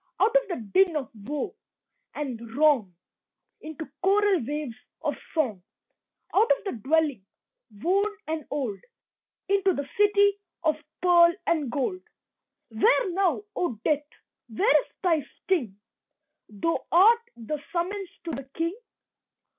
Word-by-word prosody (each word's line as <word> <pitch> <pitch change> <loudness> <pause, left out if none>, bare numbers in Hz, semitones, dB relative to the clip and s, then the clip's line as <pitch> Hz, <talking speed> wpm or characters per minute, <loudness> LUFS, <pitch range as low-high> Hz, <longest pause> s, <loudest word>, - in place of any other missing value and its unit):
Out 455 +3 +3
of - - +4
the 360 - -2 0.2
din 375 -4 +5
of 280 -2 -3
woe 250 +8 -4 0.6
and 265 -6 -4 0.2
wrong 275 - +3 0.6
Into 315 0 -7
choral 390 -3 +3
waves 290 0 -4 0.3
of - - 0 0.2
song 240 - 0 0.7
Out 435 +4 +4
of - - -18
the 395 - -3
dwelling, 280 -1 +1 0.5
worn 375 - +1 0.2
and 315 -1 -2
old, 255 -9 -2 0.7
Into 390 -1 +3
the 285 -1 -4
city 405 -1 +4 0.2
of 310 -2 +2 0.3
pearl 345 -1 +6
and 305 -6 +1
gold. 295 +8 -1 0.7
Where 275 - +3
now, 385 +1 +1
O 345 -10 -1
Death, 295 -1 +1 0.4
where 395 - +4
is - - -22 0.2
thy 330 -5 +2 0.2
sting? 240 - -1 0.7
Thou 215 +11 -1
art 435 +7 +6
the 255 +6 -5
summons 375 +2 -2
to 335 - -4
the 270 0 -6
King. 335 +3 -1
320 Hz, 130 wpm, -26 LUFS, 275-385 Hz, 0.7 s, pearl